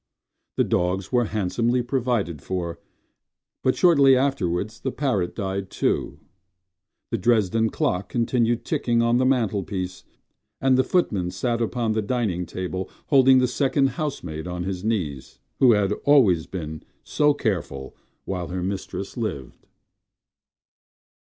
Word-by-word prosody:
The - - +4
dogs 90 +2 -1
were 120 -2 +3
handsomely 110 +5 0
provided 120 - -1
for, 85 -1 -4 0.8
But 130 - +2
shortly 140 -7 +5
afterwards 110 -6 -1
the 130 - -3
parrot 125 -12 -1
died 95 -2 -3
too. - - -1 0.9
The 115 - -1
Dresden 110 +1 +2
clock 115 - -1
continued 120 -1 0
ticking 115 -1 +1
on 120 +1 +3
the 130 - +3
mantelpiece, 100 -7 -1 0.6
And 135 -1 +3
the 130 - +4
footman 105 - 0
sat 120 +4 -2
upon 115 0 -1
the 110 0 0
dining 100 -6 -1
table 95 0 -4 0.2
Holding 130 -2 +6
the 130 0 +3
second 135 +1 +1
housemaid 90 - -4
on 90 0 -4
his 95 0 -4
knees— 80 - -3 0.2
Who 125 -3 +6
had 105 -1 +2
always 110 - +4
been 80 -4 -6 0.2
so 150 -1 +2
careful 85 - -3 0.3
while 90 -3 -3
her 90 0 -4
mistress 95 +1 -4
lived. 70 - -5
110 Hz, 130 wpm, -24 LUFS, 90-125 Hz, 0.9 s, Holding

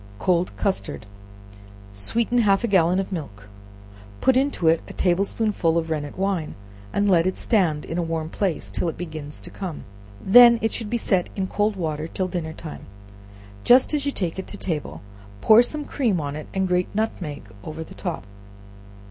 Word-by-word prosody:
Cold 180 - +1
Custard. 190 - -2 0.9
Sweeten 230 - 0
half 200 -1 +3
a - - +1
gallon 180 -3 +3
of 195 - -3
milk, 105 - -7 0.7
put 260 - +3
into 265 - +1
it 165 0 +4
a - - -9
table 185 +2 +2
spoonful 195 -7 0
of 165 -1 -2
rennet 145 -2 -3
wine, 190 -5 -1 0.4
and 205 0 +1
let 175 -3 +4
it 185 - -2
stand 175 -10 +1
in 165 - -3
a - - +2
warm 165 -1 -2
place 180 0 -2
till 175 - -1
it 160 - -7
begins 155 -4 -6
to - - -9
come, 185 -6 -6 0.4
when 235 +4 +8
it 225 - +1
should 225 -3 -3
be 240 - 0
set 190 -5 0
in 195 - -1
cold 205 +2 0
water 160 -3 -3
till 185 +2 -2
dinner 170 -3 -4
time; 160 -1 -9 0.8
just 255 +4 +5
as 295 -2 +1
you 280 - 0
take 180 -7 -3
it 190 - -6
to 205 - -7
table, 160 -7 -4 0.4
pour 220 - +7
some 295 +4 -2
cream 230 - 0
on 145 -1 -4
it, 155 - -7
and 190 -1 0
grate 180 0 +1
nutmeg 180 -9 -3 0.2
over 155 +1 -6
the - - -13
top. 175 - -5
180 Hz, 185 wpm, -23 LUFS, 160-210 Hz, 0.9 s, when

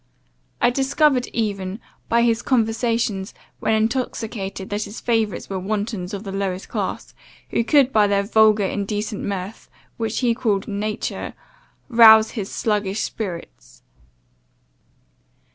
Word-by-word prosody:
I 240 - +4
discovered 270 0 +2
even, 200 -3 -3 0.3
by 235 0 +3
his 230 -1 +2
conversation, 230 -4 0 0.4
when 220 - +1
intoxicated 220 -4 -2
that 210 +1 -1
his 210 - -8
favourites 225 -5 -1
were 190 -1 -3
wantons 205 -1 -3
of 200 0 -5
the 195 - -6
lowest 195 -1 -3
class, - - -4 0.4
who - - +1
could 275 +1 +4
by 210 -1 +5
their 200 0 +2
vulgar, 215 -1 +4
indecent 205 +2 -3
mirth, 200 +1 -5 0.3
which 225 0 -2
he 240 -2 +3
called 210 -4 -1
nature, 210 +1 -3 0.5
rouse 220 -3 +7
his 205 -5 -5
sluggish 210 -2 -1
spirits. 170 - -7
215 Hz, 125 wpm, -22 LUFS, 200-230 Hz, 0.5 s, rouse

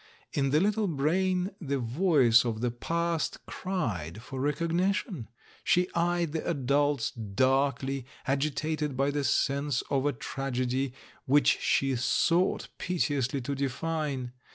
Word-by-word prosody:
In 135 -1 +1
the 150 +3 +4
little 210 +3 +1
brain 180 +5 +1
the 140 -3 -1
voice 125 -2 +4
of 115 -3 -2
the 120 -1 +1
past 170 +6 -1
cried 110 - -3
for 130 - -6
rec 145 +1 +1
ognition. 175 - -1 0.4
She 180 +1 +2
eyed 170 -1 +1
the 160 0 -2
adults 145 -2 +1
darkly, 130 +4 0 0.2
agitated 150 +1 -1
by 140 +1 +2
the 145 0 -1
sense 140 -1 +1
of 140 0 +2
a 145 - +1
tragedy 130 +1 -2 0.3
which 145 +2 +4
she 135 -1 +2
sought 165 +9 +1
pite 180 -4 0
ously 135 -1 0
to 140 +3 -3
define. 140 -1 -2
140 Hz, 130 wpm, -29 LUFS, 130-165 Hz, 0.4 s, the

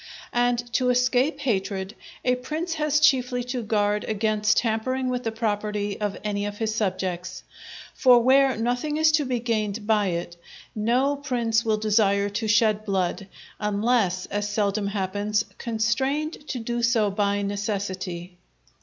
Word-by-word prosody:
And 245 0 +2 0.2
to 250 +2 +2
escape 250 +4 +2
hatred, 195 -4 -2 0.3
a 250 - +4
prince 310 +7 -3
has 300 -2 +1
chiefly 255 -5 +3
to 250 0 -3
guard 210 -1 0
against 215 0 +1
tampering 255 +3 0
with 250 0 -2
the 225 - -1
property 210 -2 -2
of 205 -1 -2
any 205 -1 -2
of 205 0 -6
his 220 -1 -1
subjects; 185 -3 -3 0.5
for 250 -2 +6
where 265 0 +4
nothing 245 +6 -1
is 315 0 +4
to 310 -2 +2
be 250 -2 -1
gained 215 -3 -2
by 210 -2 +2
it, 175 -1 -4 0.4
no 245 +6 +1
prince 235 -5 0
will 220 -2 +1
desire 205 -2 +2
to 220 +2 -3
shed 215 0 +3
blood, 195 -1 -1 0.3
unless, 210 -3 +1
as 205 0 -3
seldom 205 -1 0
happens, 205 +1 -1
constrained 265 +7 -1
to 260 - -3
do 240 0 -3
so 230 -3 +2
by 200 0 0
necessity. 190 -3 -4
220 Hz, 145 wpm, -25 LUFS, 205-250 Hz, 0.5 s, for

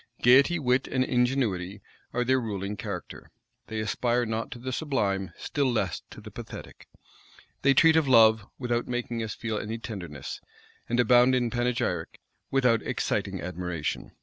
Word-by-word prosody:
Gayety, 140 +8 +6
wit, 130 -3 +1
and 130 -1 +1
ingenuity 120 -7 0 0.3
are 125 +1 0
their 130 +1 +2
ruling 100 -2 -4
character: - - -7 0.4
they 110 - -4
aspire 120 +3 0
not 110 0 -3
to 135 - -7
the 130 +2 -5
sublime; 100 - -1
still 140 -3 0
less 120 - -1
to - - -11
the - - -11
pathetic. - - -10 0.7
They 135 0 +4
treat 160 +2 +6
of 160 -3 +3
love, 110 -4 +6
without 120 -2 -1
making 120 -1 -3
us 110 -1 -4
feel 110 -2 -3
any 110 +2 -4
tenderness; 90 - -7 0.5
and 120 +1 +1
abound 125 +2 +5
in 120 -2 0
panegyric, 120 -9 -1 0.3
without 125 -4 +3
exciting - - -2
admiration. 90 -3 -4
120 Hz, 150 wpm, -27 LUFS, 105-125 Hz, 0.7 s, Gayety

